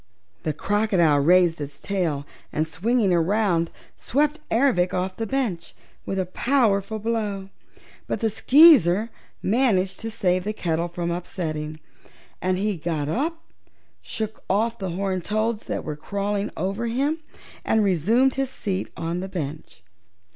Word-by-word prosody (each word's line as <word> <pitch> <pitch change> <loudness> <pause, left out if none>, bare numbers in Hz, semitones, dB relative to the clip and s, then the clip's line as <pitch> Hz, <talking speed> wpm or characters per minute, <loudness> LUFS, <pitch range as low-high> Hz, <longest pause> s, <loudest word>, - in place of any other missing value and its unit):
The 155 - -1
crocodile 185 -3 +2
raised 175 +1 +4
its 140 -1 -6
tail 170 -8 -1 0.3
and, 155 - 0
swinging 195 +6 +1
around, 175 -1 +2 0.3
swept 295 +3 +1
Ervic 225 -8 +2
off 185 +1 -2
the 225 - -3
bench 230 -9 -2 0.3
with 195 - -2
a 190 - 0
powerful 220 0 +1
blow. 210 -3 -2 0.6
But - - -2
the 225 -2 0
Skeezer 230 - +6 0.3
managed 195 -4 +2
to 225 - -4
save 185 -4 0
the 210 +2 -2
kettle 170 -3 -1
from 170 0 -3
upsetting 155 -3 -4 0.6
and 185 0 +1
he 205 0 -1
got 155 -2 -2
up, 320 - -2 0.6
shook 220 -1 -5
off 225 +4 +1
the 190 -2 -3
horned 185 0 -2
toads 215 +1 -1
that - - -3
were 150 - -4
crawling 200 +5 -2
over 200 +7 -2
him 280 +7 0 0.4
and 220 -1 +2
resumed 215 - +3
his 270 -1 -1
seat 195 -7 -3
on 170 +1 -2
the 190 +1 -5
bench. 150 - -6
195 Hz, 140 wpm, -24 LUFS, 170-225 Hz, 0.6 s, Skeezer